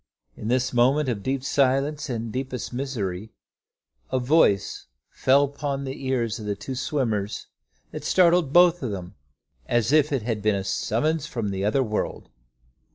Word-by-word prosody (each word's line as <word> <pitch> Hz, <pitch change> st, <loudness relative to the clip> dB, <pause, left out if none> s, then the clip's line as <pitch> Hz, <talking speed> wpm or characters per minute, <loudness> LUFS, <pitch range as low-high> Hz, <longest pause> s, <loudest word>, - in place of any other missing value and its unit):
In 105 Hz, -, -7 dB
this 125 Hz, +2 st, +1 dB
moment 130 Hz, +4 st, +3 dB
of 110 Hz, -5 st, -2 dB
deep 130 Hz, +3 st, -2 dB
silence 140 Hz, +2 st, +1 dB
and 115 Hz, -2 st, -3 dB
deepest 130 Hz, 0 st, -4 dB
misery, 110 Hz, -7 st, -4 dB, 0.8 s
a 130 Hz, -, +1 dB
voice 125 Hz, -7 st, +2 dB, 0.2 s
fell 135 Hz, +2 st, +3 dB
upon 140 Hz, 0 st, -3 dB
the 135 Hz, 0 st, -6 dB
ears 120 Hz, -3 st, -1 dB
of 105 Hz, -, -7 dB
the 100 Hz, -, -1 dB
two 130 Hz, +6 st, -6 dB
swimmers 115 Hz, -7 st, -2 dB, 0.5 s
that -, -, -7 dB
startled 175 Hz, -5 st, +3 dB
both 175 Hz, +1 st, +5 dB
of 130 Hz, -, -2 dB
them, 95 Hz, -2 st, -6 dB, 0.5 s
as 120 Hz, +1 st, +1 dB
if 150 Hz, -1 st, +4 dB
it 135 Hz, -6 st, 0 dB
had 110 Hz, -2 st, -2 dB
been 105 Hz, 0 st, +2 dB
a 95 Hz, -, -2 dB
summons 150 Hz, +10 st, -1 dB
from 115 Hz, -7 st, -3 dB
the 95 Hz, 0 st, -3 dB
other 110 Hz, +6 st, +2 dB
world. 110 Hz, -3 st, -3 dB
130 Hz, 160 wpm, -25 LUFS, 110-140 Hz, 0.8 s, both